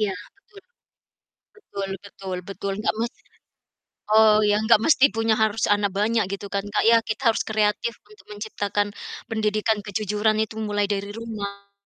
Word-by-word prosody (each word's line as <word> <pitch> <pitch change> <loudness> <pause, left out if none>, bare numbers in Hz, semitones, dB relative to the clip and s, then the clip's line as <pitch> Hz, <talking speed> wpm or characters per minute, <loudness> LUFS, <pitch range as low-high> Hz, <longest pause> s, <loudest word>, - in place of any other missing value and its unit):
Iya, 200 -3 0 0.2
betul. 400 0 -18 1.0
Betul 200 - -6
betul 190 -2 -7
betul, 195 0 -4
nggak - - 0
masalah. 235 +1 -6 0.8
Oh 220 -1 +7
iya, 205 - +3
nggak 225 -1 +5
mesti 295 -4 +5
punya 225 0 +2
harus 220 0 +1
anak 205 -1 +2
banyak 215 +3 +1
gitu 200 0 -5
kan, 200 0 0
Kak, 205 - 0
ya. 230 0 +7
Kita 220 +3 -4
harus - - -2
kreatif 215 +2 0
untuk 425 0 -19
menciptakan 205 -1 -2 0.4
pendidikan 215 0 0
kejujuran 210 +1 0
itu 220 0 -2
mulai 205 -1 0
dari 200 0 -3
rumah. 200 -3 -7
210 Hz, 150 wpm, -24 LUFS, 205-220 Hz, 1.0 s, Oh